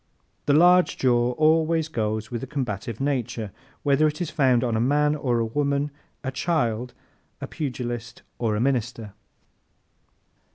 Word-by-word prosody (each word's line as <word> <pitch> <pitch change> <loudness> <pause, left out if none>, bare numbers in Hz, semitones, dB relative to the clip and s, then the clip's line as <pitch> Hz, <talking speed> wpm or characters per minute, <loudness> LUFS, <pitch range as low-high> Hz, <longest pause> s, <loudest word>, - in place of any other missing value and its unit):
The 145 - +4
large 180 +3 +5
jaw 120 -1 +2
always 160 +2 +2
goes 110 -5 -2
with 120 -2 -3
a 135 - -5
combative 120 -5 -4
nature, 125 -6 -2 0.3
whether 145 +2 +4
it 150 0 -3
is 175 -4 -3
found 130 -4 +3
on 120 -2 0
a 110 - +1
man 145 +4 +3
or 125 -5 0
a 115 - +1
woman, 140 +4 0 0.3
a 130 - -2
child, 125 -6 -1 0.4
a - - -4
pugilist 120 -4 -5 0.2
or 110 -3 0
a - - -1
minister. 120 -4 -1
130 Hz, 150 wpm, -25 LUFS, 115-150 Hz, 0.4 s, large